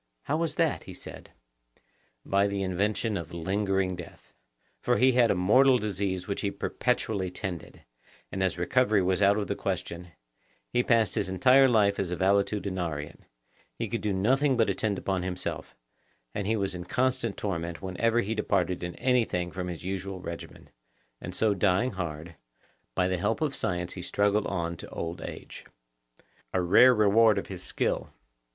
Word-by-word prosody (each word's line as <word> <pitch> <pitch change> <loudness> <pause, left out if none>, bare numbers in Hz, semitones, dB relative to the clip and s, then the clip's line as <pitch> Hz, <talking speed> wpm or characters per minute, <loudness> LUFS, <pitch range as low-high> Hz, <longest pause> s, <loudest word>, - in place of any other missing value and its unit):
How 145 - -1
was 160 -1 -1
that? 165 -3 0
he - - -9
said. - - -10 1.0
By 100 +1 +2
the 100 -1 -2
invention 100 +3 0
of 85 -1 -7
lingering 95 +1 0
death; 85 -1 -12 0.5
for 120 - +2
he 130 +1 +5
had 120 -2 +4
a - - +3
mortal 130 +9 +5
disease 100 -4 -2
which 100 - -2
he 100 - 0
perpetually 105 -4 -1
tended, 90 -2 -6 0.5
and 95 - -3
as 95 -1 0
recovery 105 +2 +2
was 95 +1 +1
out 100 +1 +5
of 105 - -1
the - - -2
question, 85 +1 -4 0.6
he 125 - +1
passed 115 -5 +2
his - - 0
entire 130 +9 +5
life 105 -5 +3
as 95 - -1
a 90 - -2
valetudinarian; 95 -5 -1 0.6
he - - -2
could - - -3
do 105 - -1
nothing 130 +8 +2
but 110 -4 +3
attend 100 +1 -1
upon 95 -1 -1
himself, 90 0 -4 0.6
and 100 -1 -3
he 110 - +2
was 100 -3 -1
in 90 -1 -6
constant 125 0 0
torment 85 -3 -4
whenever 115 +5 +1
he 110 +1 -2
departed 95 -5 0
in 90 0 -5
anything 115 -9 +1
from 90 +1 -4
his 85 -2 -6
usual 95 0 -4
regimen, 85 -2 -9 0.5
and - - -6
so 110 -2 +2
dying 100 +6 +2
hard, 85 -3 -5 0.6
by 90 - +2
the 90 -1 -1
help 105 +4 0
of 155 -3 0
science 90 -5 -2
he 90 - -7
struggled 105 +3 +1
on 85 -2 -2
to - - -9
old 85 +1 -5
age. - - -8 0.9
A 95 - +2
rare 120 +8 +7
reward 110 0 +5
of 100 - -2
his 95 -2 -7
skill! 90 - -2
100 Hz, 170 wpm, -28 LUFS, 90-110 Hz, 1.0 s, rare